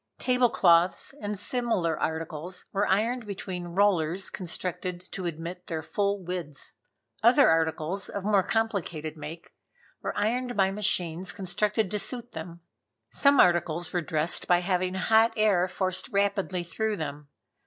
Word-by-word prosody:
Table 250 Hz, -1 st, +2 dB
cloths 175 Hz, +2 st, +3 dB
and 205 Hz, 0 st, -3 dB
similar 205 Hz, -7 st, 0 dB
articles 160 Hz, +2 st, -4 dB
were 205 Hz, +1 st, +1 dB
ironed 225 Hz, +4 st, +1 dB
between 185 Hz, -3 st, -5 dB
rollers 190 Hz, -2 st, +2 dB
constructed 180 Hz, 0 st, -4 dB
to 185 Hz, -2 st, -3 dB
admit 170 Hz, +2 st, -6 dB
their 160 Hz, -2 st, -3 dB
full 200 Hz, +2 st, -1 dB
width. 175 Hz, -5 st, -6 dB, 0.5 s
Other -, -, +6 dB
articles 160 Hz, +3 st, +1 dB
of 200 Hz, -, -5 dB
more 205 Hz, -1 st, +3 dB
complicated 185 Hz, -8 st, -2 dB
make, 160 Hz, +2 st, -9 dB, 0.5 s
were -, -, -4 dB
ironed 245 Hz, +3 st, -1 dB
by 190 Hz, -1 st, +3 dB
machines 185 Hz, -3 st, 0 dB
constructed 205 Hz, +2 st, -1 dB
to 210 Hz, -, -1 dB
suit 240 Hz, +2 st, -1 dB
them. 170 Hz, +1 st, -8 dB, 0.5 s
Some 280 Hz, -1 st, +4 dB
articles 175 Hz, -1 st, +3 dB
were 175 Hz, -, +1 dB
dressed 155 Hz, +1 st, -1 dB
by 175 Hz, 0 st, +4 dB
having 185 Hz, 0 st, 0 dB
hot 220 Hz, +4 st, +4 dB
air 200 Hz, -4 st, +3 dB
forced 185 Hz, 0 st, -2 dB
rapidly 200 Hz, -2 st, 0 dB
through 215 Hz, +5 st, -2 dB
them. 145 Hz, -2 st, -5 dB
185 Hz, 140 wpm, -27 LUFS, 170-205 Hz, 0.5 s, Other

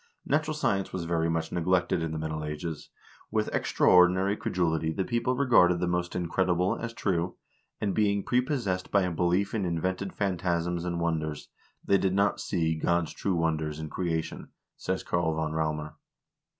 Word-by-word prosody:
"Natural 155 Hz, +1 st, 0 dB
science 100 Hz, -10 st, 0 dB
was 90 Hz, -2 st, -4 dB
very 85 Hz, -1 st, 0 dB
much 80 Hz, -1 st, -1 dB
neglected 90 Hz, 0 st, +1 dB
in 80 Hz, -1 st, -2 dB
the 80 Hz, -, -3 dB
Middle 80 Hz, 0 st, -3 dB
Ages. 75 Hz, 0 st, -5 dB, 0.4 s
With 110 Hz, -1 st, -1 dB
extraordinary 95 Hz, +2 st, +4 dB
credulity 80 Hz, -5 st, 0 dB
the 95 Hz, +4 st, -2 dB
people 120 Hz, +1 st, 0 dB
regarded 115 Hz, -10 st, +4 dB
the 90 Hz, -, 0 dB
most 90 Hz, 0 st, -1 dB
incredible 90 Hz, +1 st, +1 dB
as 115 Hz, -, -5 dB
true, 90 Hz, -6 st, -1 dB, 0.4 s
and, 100 Hz, -2 st, -1 dB
being 100 Hz, -2 st, +2 dB
prepossessed 125 Hz, -8 st, 0 dB
by 100 Hz, -1 st, +3 dB
a 90 Hz, -, -1 dB
belief 90 Hz, +4 st, +1 dB
in 110 Hz, -3 st, 0 dB
invented 95 Hz, +3 st, -2 dB
phantasms 85 Hz, -2 st, -1 dB
and 85 Hz, -1 st, -2 dB
wonders, 80 Hz, -3 st, -2 dB, 0.4 s
they 100 Hz, -, +4 dB
did 95 Hz, 0 st, +1 dB
not 100 Hz, +1 st, +2 dB
see 80 Hz, -4 st, 0 dB
God's 85 Hz, 0 st, +1 dB
true 95 Hz, -2 st, -1 dB
wonders 80 Hz, -2 st, 0 dB
in 80 Hz, -1 st, -6 dB
creation," 80 Hz, -3 st, -3 dB, 0.3 s
says 95 Hz, 0 st, -3 dB
Karl 85 Hz, -2 st, 0 dB
von 80 Hz, -1 st, -1 dB
Raumer. 75 Hz, -1 st, -2 dB
90 Hz, 165 wpm, -28 LUFS, 80-95 Hz, 0.4 s, extraordinary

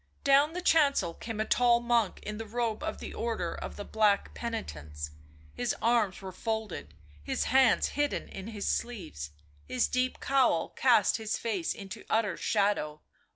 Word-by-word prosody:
Down 285 Hz, +2 st, +5 dB
the 360 Hz, +1 st, -4 dB
chancel 280 Hz, -, +3 dB
came 225 Hz, +4 st, -6 dB
a 215 Hz, -, +1 dB
tall 240 Hz, 0 st, +4 dB
monk 235 Hz, -4 st, +1 dB
in 210 Hz, 0 st, -5 dB
the 225 Hz, -, -5 dB
robe 230 Hz, 0 st, -1 dB
of -, -, -3 dB
the -, -, -7 dB
Order 225 Hz, -7 st, -2 dB
of -, -, -6 dB
the 205 Hz, -, -6 dB
Black 210 Hz, -2 st, +2 dB
Penitents; 75 Hz, -, -5 dB, 0.4 s
his -, -, -1 dB
arms 225 Hz, -5 st, +1 dB
were 190 Hz, -, -5 dB
folded, 205 Hz, -, -4 dB, 0.3 s
his -, -, -1 dB
hands 260 Hz, -3 st, +4 dB
hidden 290 Hz, 0 st, -1 dB
in 195 Hz, +1 st, -8 dB
his 215 Hz, -3 st, -4 dB
sleeves, 170 Hz, -, -3 dB, 0.4 s
his 250 Hz, -, +1 dB
deep 255 Hz, 0 st, 0 dB
cowl 255 Hz, -12 st, +2 dB
cast 235 Hz, -6 st, +4 dB
his 220 Hz, -2 st, -2 dB
face 205 Hz, -7 st, -2 dB
into 195 Hz, -1 st, -8 dB
utter 215 Hz, -5 st, +1 dB
shadow. 200 Hz, -8 st, 0 dB
220 Hz, 160 wpm, -30 LUFS, 190-240 Hz, 0.4 s, Down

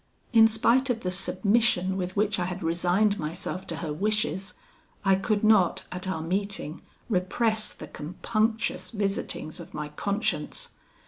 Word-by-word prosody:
"In 225 Hz, -1 st, +8 dB
spite 235 Hz, +4 st, +3 dB
of 230 Hz, -2 st, 0 dB
the 180 Hz, -, -1 dB
submission 195 Hz, 0 st, +2 dB
with 185 Hz, -1 st, -3 dB
which 205 Hz, -1 st, +1 dB
I 175 Hz, -, 0 dB
had 185 Hz, +1 st, -4 dB
resigned 180 Hz, +5 st, +2 dB
myself 180 Hz, +4 st, -4 dB
to 170 Hz, -, -1 dB
her 150 Hz, -, -2 dB
wishes, 200 Hz, +1 st, -1 dB, 0.5 s
I 195 Hz, -, +6 dB
could 205 Hz, +2 st, +1 dB
not, 190 Hz, -4 st, +4 dB
at 180 Hz, +1 st, -5 dB
our 160 Hz, -4 st, -2 dB
meeting, 190 Hz, -2 st, -2 dB, 0.3 s
repress 215 Hz, +2 st, +1 dB
the -, -, -9 dB
compunctious 215 Hz, +9 st, -1 dB
visitings 195 Hz, -6 st, -2 dB
of -, -, -10 dB
my 150 Hz, 0 st, -4 dB
conscience. 205 Hz, -, -2 dB
195 Hz, 145 wpm, -27 LUFS, 180-215 Hz, 0.5 s, In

